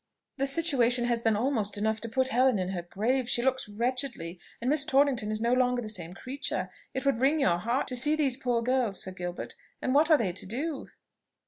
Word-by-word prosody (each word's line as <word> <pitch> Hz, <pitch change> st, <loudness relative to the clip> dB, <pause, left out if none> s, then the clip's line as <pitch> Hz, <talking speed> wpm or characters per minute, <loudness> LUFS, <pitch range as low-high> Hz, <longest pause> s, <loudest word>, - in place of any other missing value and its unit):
"The 275 Hz, 0 st, 0 dB
situation 260 Hz, -6 st, +3 dB
has 235 Hz, -1 st, 0 dB
been 225 Hz, -2 st, +2 dB
almost 215 Hz, -3 st, 0 dB
enough 220 Hz, +1 st, -1 dB
to 230 Hz, -, -5 dB
put 260 Hz, +3 st, +1 dB
Helen 255 Hz, -1 st, +3 dB
in 185 Hz, -1 st, -2 dB
her 185 Hz, -2 st, -3 dB
grave; 230 Hz, +8 st, -1 dB
she 240 Hz, -, +1 dB
looks 260 Hz, -3 st, 0 dB
wretchedly; 235 Hz, -6 st, -2 dB, 0.2 s
and 235 Hz, -, -4 dB
Miss 295 Hz, +1 st, +3 dB
Torrington 275 Hz, -6 st, +2 dB
is 215 Hz, 0 st, -1 dB
no 235 Hz, +2 st, +1 dB
longer 250 Hz, -1 st, +2 dB
the 220 Hz, -3 st, -5 dB
same 180 Hz, -4 st, -4 dB
creature. 270 Hz, +6 st, -3 dB, 0.2 s
It 265 Hz, -, -3 dB
would 275 Hz, -4 st, +2 dB
wring 280 Hz, +5 st, +3 dB
your 175 Hz, -12 st, +2 dB
heart 235 Hz, +8 st, -1 dB
to 255 Hz, -, -4 dB
see 295 Hz, +5 st, +2 dB
these 280 Hz, -5 st, +1 dB
poor 245 Hz, -3 st, -1 dB
girls, 245 Hz, -5 st, 0 dB
Sir 190 Hz, -, -2 dB
Gilbert; 175 Hz, -1 st, -6 dB, 0.3 s
and 255 Hz, -, -1 dB
what 300 Hz, +3 st, +4 dB
are 310 Hz, -, +7 dB
they 205 Hz, -9 st, -1 dB
to 185 Hz, -, -4 dB
do?" 275 Hz, -, -4 dB
245 Hz, 220 wpm, -28 LUFS, 215-270 Hz, 0.3 s, are